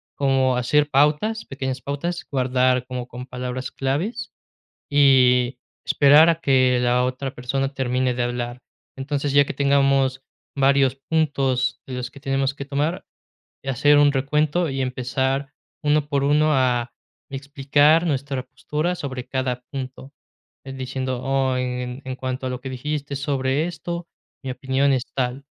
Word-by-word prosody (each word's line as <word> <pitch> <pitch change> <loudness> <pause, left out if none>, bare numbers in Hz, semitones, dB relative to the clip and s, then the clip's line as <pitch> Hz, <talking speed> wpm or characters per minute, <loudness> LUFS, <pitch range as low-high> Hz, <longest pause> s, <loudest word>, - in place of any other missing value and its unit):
como 135 -2 +2
hacer 150 +4 +2
pautas, 150 +11 +2
pequeñas 130 -1 -4
pautas, 170 +7 -3
guardar 130 -1 +2
como 125 -1 -5
con 125 0 -8
palabras 125 0 -5
claves, 185 - -2 0.6
y 130 -3 +4 0.3
esperar 150 +3 +6
a 165 -1 +1
que 130 -4 +3
la 125 0 +2
otra 130 +1 -4
persona 135 +2 -2
termine 130 -1 0
de 120 0 -1
hablar. 120 0 -4 0.4
Entonces, 140 +1 -2
ya 145 0 +6
que - - -5
tengamos 135 -1 +2 0.3
varios 135 -1 +3
puntos 135 -5 +1
de 130 - -5
los 125 0 -4
que 140 - -13
tenemos 135 0 0
que 140 - -7
tomar, 145 +5 -2 0.6
hacer 135 +2 +3
un 145 -1 +5
recuento 150 +4 +1
y 135 0 -3
empezar 130 +2 -2 0.3
1 150 0 +2
por 140 -2 0
1 150 +2 +3
a 125 -2 +1 0.4
explicar 145 +4 +2
nuestra 140 -3 -2
postura 150 +5 -3
sobre 130 -6 -6
cada 130 -2 -2
punto. 135 0 -7 0.5
En 135 0 -7
diciendo: 130 -1 -3
"Oh, 135 -1 +1
en 125 0 -3 0.2
cuanto 130 0 -4
a - - -2
lo 125 0 -5
que 130 - -5
dijiste 145 +2 -4
sobre 140 +1 0
esto, 170 0 -5 0.4
mi 135 - -3
opinión 130 +2 +1
es 130 -1 -1
tal, 130 +1 -2
135 Hz, 145 wpm, -22 LUFS, 130-145 Hz, 0.6 s, esperar